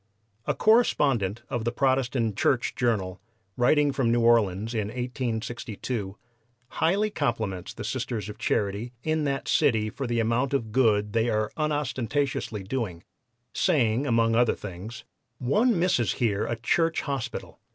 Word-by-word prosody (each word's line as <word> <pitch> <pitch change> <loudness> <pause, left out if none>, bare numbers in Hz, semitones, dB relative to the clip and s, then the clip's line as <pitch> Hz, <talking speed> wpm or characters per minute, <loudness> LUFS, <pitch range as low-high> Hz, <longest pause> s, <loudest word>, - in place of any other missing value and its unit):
A - - +1
correspondent 135 - +2
of 120 -4 -3
the 120 - 0
(Protestant) 130 -4 +1
Church 120 +4 +1
Journal, 100 -6 -1 0.3
writing 145 +4 +3
from 130 -4 +1
New 120 0 +2
Orleans 115 -2 +3
in 110 -3 -1
1862, 120 -3 -4 0.5
highly 200 +6 +1
compliments 110 - -2
the - - -8
Sisters 110 -5 -3
of 105 - -9
Charity 105 +4 -1
in 155 -1 0
that 140 -1 -2
city 110 -8 +2
for 135 +2 -4
the 120 -1 0
amount 120 +5 +1
of 115 -5 -2
good 105 -4 +2
they 115 +1 +2
are 110 -1 0
unostentatiously 140 -6 -1
doing, 95 -6 -4 0.5
saying 135 - +2
among 115 -2 +3
other 120 0 +3
things: 100 +5 -8 0.3
"One 210 - +2
misses 165 - +2
here 105 -4 0
a 120 - -1
church 165 +8 +1
hospital. 130 -4 -5
120 Hz, 140 wpm, -26 LUFS, 110-135 Hz, 0.5 s, writing